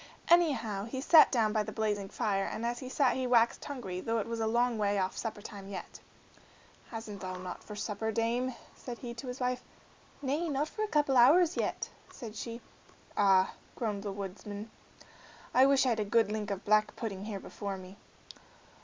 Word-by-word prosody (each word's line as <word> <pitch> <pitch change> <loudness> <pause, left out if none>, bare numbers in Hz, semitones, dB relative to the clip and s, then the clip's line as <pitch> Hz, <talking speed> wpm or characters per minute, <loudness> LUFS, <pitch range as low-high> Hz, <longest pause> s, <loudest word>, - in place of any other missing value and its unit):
Anyhow 285 - +4
down 205 +4 -5
he 260 - -3
sat 310 +3 +7 0.2
by 215 - +2
the 210 - -4
blazing 210 -3 -1
fire, 195 -1 0
and 225 - -4
as 240 +1 -1
he 255 - -7
sat 265 0 +2
he 260 -1 -1
waxed 235 -1 +3
hungry, 195 -10 -5
though 230 +3 0
it 215 - -1
was 230 0 -4
a 220 - +1
long 235 0 +2
way 205 -1 +2
off 190 -1 0
supper 215 -3 -4
time 200 -3 -8
yet. 195 -2 -7 0.9
"Hasn't 220 -3 -7
thou 185 -1 -4
naught 180 -1 -7
for 210 - -8
supper, 215 +1 -2
dame?" 235 +3 0 0.2
said 245 -2 -7
he 240 -1 -6
to 240 +3 -8
his 250 +1 -5
wife. 250 0 0 0.6
"Nay, 300 +5 0
not 290 +2 0
for 430 - -6
a 430 - +1
couple 295 -7 +2
of - - +9
hours 350 +2 +4
yet," - - -1 0.2
said 225 -4 -8
she. 235 +1 -6 0.5
"Ah!" 190 -2 +4 0.2
groaned 210 -4 -2
the 200 -1 -4
woodman, 200 +2 -6 0.8
"I 260 +2 +7
wish 275 -1 +4
I'd 235 -3 +2
a - - +2
good 210 0 +2
link 215 -1 -2
of 200 0 -4
black 215 0 +3
pudding 200 -4 -4
here 210 -2 -4
before 200 0 -5
me." 185 +1 -11
225 Hz, 200 wpm, -31 LUFS, 200-250 Hz, 0.9 s, of